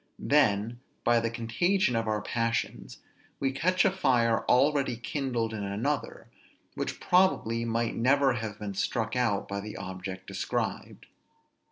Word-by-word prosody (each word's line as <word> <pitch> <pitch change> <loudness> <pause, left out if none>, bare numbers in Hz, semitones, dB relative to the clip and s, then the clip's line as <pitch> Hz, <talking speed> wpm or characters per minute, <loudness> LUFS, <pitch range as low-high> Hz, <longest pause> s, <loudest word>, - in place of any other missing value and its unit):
Then, 115 -5 +2 0.2
by 120 0 +4
the 115 0 -1
contagion 120 - +1
of 115 0 0
our 105 -1 -1
passions, 115 0 -2 0.4
we 135 -1 +1
catch 185 +9 +2
a 195 - +4
fire 120 -11 +2
already 135 -1 +3
kindled 120 -3 -2
in 105 -2 -4
another, 110 +9 -3 0.5
which - - -4
probably 120 -11 +2
might 115 0 0
never 135 +2 +3
have 110 -3 -4
been 105 -1 -5
struck 110 +4 -1
out 115 -6 +1
by 100 0 -3
the 105 +1 -7
object 95 0 -6
described. - - -3
115 Hz, 140 wpm, -28 LUFS, 110-135 Hz, 0.5 s, by